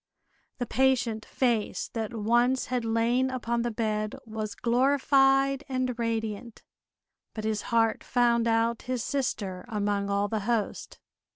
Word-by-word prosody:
The 245 - -2
patient 240 -3 +1
face 235 -5 0
that 225 -2 -3
once 240 +4 +2
had 245 -2 0
lain 230 +3 +1
upon 235 -2 -1
the 240 - -1
bed 215 -2 -2
was 215 -1 -5
glorified 270 +2 +3
and 255 -1 -1
radiant, 225 0 -3 0.7
but 215 - -4
his 215 -1 -1
heart 225 -1 +2
found 235 -1 +2
out 230 0 +1
his 250 -3 -1
sister 200 -9 -2
among 205 -3 -1
all 200 0 +1
the 220 +1 -2
host. 215 0 -2
230 Hz, 130 wpm, -28 LUFS, 215-250 Hz, 0.7 s, glorified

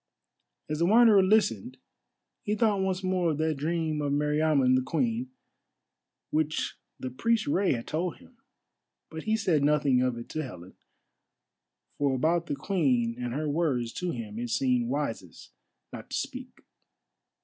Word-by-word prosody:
As 155 0 -3
the 170 - +3
Wanderer 220 -1 +6
listened 150 - +1 0.6
he 210 - -1
thought 210 -3 +2
once 190 0 -1
more 185 -2 +1
of 155 - -1
that 160 0 +1
dream 155 0 -1
of 145 -1 -1
Meriamun 150 -2 +2
the 130 - +3
Queen, 125 -4 -1 1.0
which 155 0 -1 0.2
the 130 - -5
priest 230 - +1
Rei 185 +5 +2
had 115 -2 -4
told 170 +2 -2
him. - - -20 0.7
But 160 0 -7
he 220 0 +2
said 170 -9 +1
nothing 145 -3 +3
of 125 -2 0
it 120 - -8
to 155 - -3
Helen; 90 - -9 1.3
for 140 -2 +2
about 165 +5 +1
the 145 - -2
Queen 135 - 0
and 120 - -3
her 155 +1 -2
words 145 -7 0
to 180 - -2
him 115 -6 -5
it 120 0 -4
seemed 125 -1 +1
wisest 120 - -4 0.4
not - - -9
to - - -2
speak. - - -6
150 Hz, 155 wpm, -28 LUFS, 125-175 Hz, 1.3 s, Wanderer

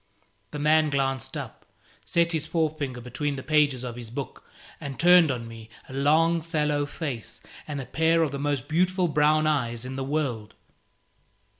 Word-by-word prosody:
The - - -6
man 155 +1 +3
glanced 135 -2 -1
up, - - -8 0.4
set 170 0 +1
his 160 -2 -1
forefinger 155 -6 -2
between 140 +4 -3
the 130 - -6
pages 145 -3 +2
of 120 -1 -6
his 120 -2 -8
book, 135 +4 -6 0.4
and 140 -2 -7
turned 175 -2 +6
on 120 -3 -3
me 115 -1 -11 0.2
a - - -11
long 160 +5 +3
sallow 150 -3 0
face 120 -7 -6 0.3
and 145 -2 -4
a 135 - -5
pair 165 +3 +2
of 150 - -1
the 140 - -4
most 145 -2 -1
beautiful 180 +3 +1
brown 155 0 +3
eyes 125 -6 0
in 130 +1 -6
the 135 - -2
world. 130 -7 -2
145 Hz, 170 wpm, -26 LUFS, 130-155 Hz, 0.4 s, turned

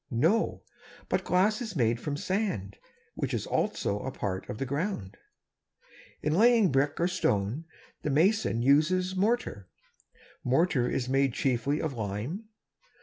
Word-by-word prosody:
No; 160 - +1 0.5
but - - +1
glass 205 +5 +2
is 220 -6 -5
made 115 -4 +2
from 145 +2 -3
sand; 150 - -2 0.4
which - - -2
is - - -2
also 100 - -1
a 130 - -4
part 95 -6 -4
of 105 - -4
the 135 - -2
ground. 140 - -3 1.1
In 150 - +1
laying 225 0 +5
brick 140 +3 +1
or 170 - +3
stone, 130 - 0 0.4
the - - -2
mason 160 - +2
uses 180 +7 +3
mortar. 190 - 0 0.8
Mortar 130 -1 +2
is 125 - -1
made 135 -1 +2
chiefly 135 +3 0
of 155 -3 -2
lime. 115 - -4
145 Hz, 140 wpm, -29 LUFS, 120-185 Hz, 1.1 s, laying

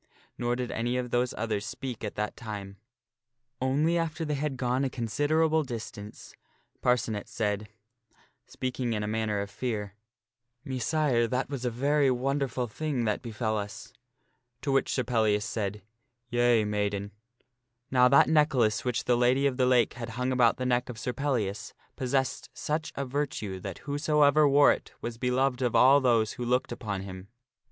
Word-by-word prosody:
Nor 120 0 -1
did 125 0 -3
any 120 +2 -1
of 125 -1 -3
those 125 0 +1
others 110 -2 -1
speak 120 +2 -6
at 105 - -4
that 105 0 -2
time; 100 -3 -7 0.8
only 150 +6 +2
after 165 0 -2
they 150 - -1
had 145 -1 -2
gone 125 +1 0
a 135 - 0
considerable 155 +7 +1
distance 110 -5 -8 0.5
Parcenet 115 -4 0
said, 105 -1 -2 0.8
speaking 125 -2 -3
in 105 -1 -2
a - - -2
manner 105 -1 -1
of 100 0 -6
fear, 105 -6 -3 0.4
" 125 +1 -49
Messire, 130 -2 +1
that 130 +3 -2
was 130 -3 -4
a - - +2
very 140 +4 +2
wonderful 130 0 0
thing 130 +1 -2
that 105 -1 0
befell 110 -1 -2
us." 100 +1 -7 0.7
To 140 - 0
which 135 0 +2
Sir 130 - 0
Pellias 110 -4 +1
said, 105 -2 -3 0.2
" 120 0 -51
Yea, 120 -2 +3
maiden." 105 -1 -2 0.8
Now 125 -1 +6
that 140 +2 +6
necklace 135 -9 +3
which 125 -1 -1
the 125 - +3
Lady 125 +3 +3
of 135 -3 +1
the 130 -1 +3
Lake 125 -3 +3
had 120 -1 -6
hung 125 +1 0
about 125 -3 +3
the 130 - -3
neck 125 0 +1
of 120 - -6
Sir 125 +2 -3
Pellias 120 -7 -2 0.2
possessed 130 0 -1
such 155 +1 -2
a 140 - -2
virtue 125 -8 -3
that - - -6
whosoever 150 0 +3
wore 140 +1 +6
it - - -4
was 115 -1 -6
be 125 - 0
loved 130 0 +1
of 125 -2 0
all 135 +3 +7
those 115 -4 +3
who 125 - -6
looked 125 +1 0
upon 100 -4 -4
him. 95 0 -8
125 Hz, 175 wpm, -28 LUFS, 110-135 Hz, 0.8 s, all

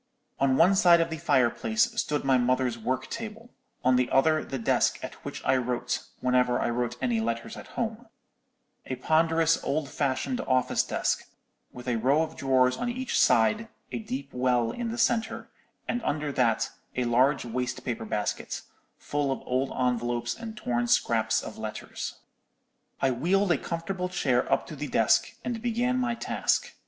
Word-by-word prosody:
"On 135 -1 +3
one 175 +4 +6
side 175 -3 +6
of 165 0 0
the 160 - -4
fireplace 130 - +2 0.2
stood 150 -1 -2
my 135 -2 +3
mother's 125 0 +1
work 130 +3 -2
table, 230 +1 -7 0.3
on 130 0 +5
the 125 -1 +1
other 155 +3 +3
the 135 - -5
desk 115 - +2
at - - -5
which - - -6
I - - +4
wrote, 125 0 -2 0.2
whenever 125 -1 +2
I - - 0
wrote 120 0 -2
any 120 -3 +1
letters 115 0 -3
at - - -10
home—a 225 - -8
ponderous 160 +4 +2
old 145 0 -1
fashioned 145 - -1
office 130 -1 +2
desk, - - -1 0.5
with 125 0 -11
a 120 -2 +1
row 135 +7 +3
of 160 0 -6
drawers 130 -1 +2
on 245 - -2
each 255 +1 -1
side, 210 - +3 0.2
a - - -3
deep 250 +5 -5
well 125 -2 +1
in 240 -1 -4
the 230 - -4
centre, 230 -1 0 0.4
and 245 - -1
under 150 -6 -1
that 120 -5 +1 0.2
a 125 - 0
large 130 +4 +3
waste 125 +1 -3
paper 120 -3 -3
basket, 105 -1 -3 0.3
full 145 -1 -1
of 135 - -3
old 130 +2 0
envelopes 120 -1 0
and 225 -1 -8
torn 120 - -1
scraps - - +2
of - - -8
letters. - - -5 0.9
"I 135 - +4
wheeled 180 +10 +2
a 165 - +4
comfortable 180 +2 -3
chair 180 - +1
up - - +2
to - - -8
the - - -4
desk, - - +2
and 235 -2 -3
began 245 +2 0
my 240 -2 0
task. - - 0
135 Hz, 170 wpm, -27 LUFS, 125-195 Hz, 0.9 s, one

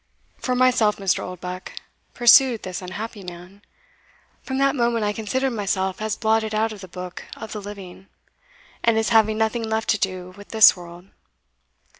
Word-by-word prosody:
For 250 - -1
myself, 250 -4 +3
Mr. 195 -2 0
Oldbuck," 180 0 -7 0.4
pursued 240 -1 +6
this 185 0 -5
unhappy 205 +3 -7
man, 180 +3 -11 0.8
"from 265 - -4
that 275 +2 +2
moment 235 -3 +1
I 205 - 0
considered 255 +5 -1
myself 190 -3 -2
as 215 0 -1
blotted 220 -1 0
out 220 +1 +1
of 205 - -11
the 190 - -9
book 180 0 -8
of 220 - -8
the 210 - -5
living, 195 -2 -10 0.8
and 230 -1 +3
as 225 - +1
having 220 -1 +3
nothing 220 +1 0
left 220 0 -2
to 220 - +2
do 185 -2 -3
with 205 0 -13
this 220 -1 +7
world. 175 +1 -12
215 Hz, 165 wpm, -23 LUFS, 185-225 Hz, 0.8 s, this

